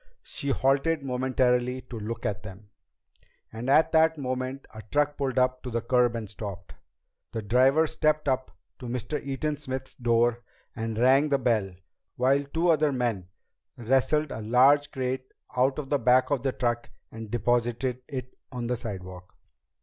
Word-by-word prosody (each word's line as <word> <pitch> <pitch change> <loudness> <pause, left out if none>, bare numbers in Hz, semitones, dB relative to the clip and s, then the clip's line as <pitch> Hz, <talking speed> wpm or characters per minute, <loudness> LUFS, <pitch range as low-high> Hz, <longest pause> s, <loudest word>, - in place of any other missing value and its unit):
She 140 - -4
halted 140 +4 +1
momentarily 125 -1 +1
to 120 -3 -8
look 115 +2 -5
at 105 0 -2
them, 100 +1 -12 0.8
and 115 +4 -4
at 155 +3 +5
that 160 0 +4
moment 130 0 -3
a 110 - -8
truck 145 0 +2
pulled 135 -3 -2
up 130 0 +2
to 130 - -6
the 115 0 -2
curb 120 -1 +2
and 115 -2 -4
stopped. 100 -3 -8 0.6
The 110 - -3
driver 130 +8 +4
stepped 155 -1 0
up 130 -1 0 0.3
to 125 - -7
Mr. 125 +5 -3
Eaton 145 +2 -2
Smith's 130 -2 -6
door 120 -1 +1 0.3
and 115 -1 -3
rang 135 +5 +4
the 140 - +3
bell 110 -7 0 0.4
while 135 +3 +2
two 165 +5 0
other 155 -2 +3
men 120 -8 -1 0.5
wrestled 135 +5 +1
a 110 - -5
large 135 +6 +4
crate 130 -1 -3 0.2
out 130 +2 +2
of 145 -3 -5
the 145 - +2
back 125 +1 +3
of 140 -4 +1
the 135 0 0
truck 120 -2 -2 0.2
and 110 -1 -8
deposited 120 +2 0
it 130 -3 -6 0.2
on 125 -2 -4
the 125 +1 -1
sidewalk. 95 -5 -8
125 Hz, 165 wpm, -27 LUFS, 115-140 Hz, 0.8 s, at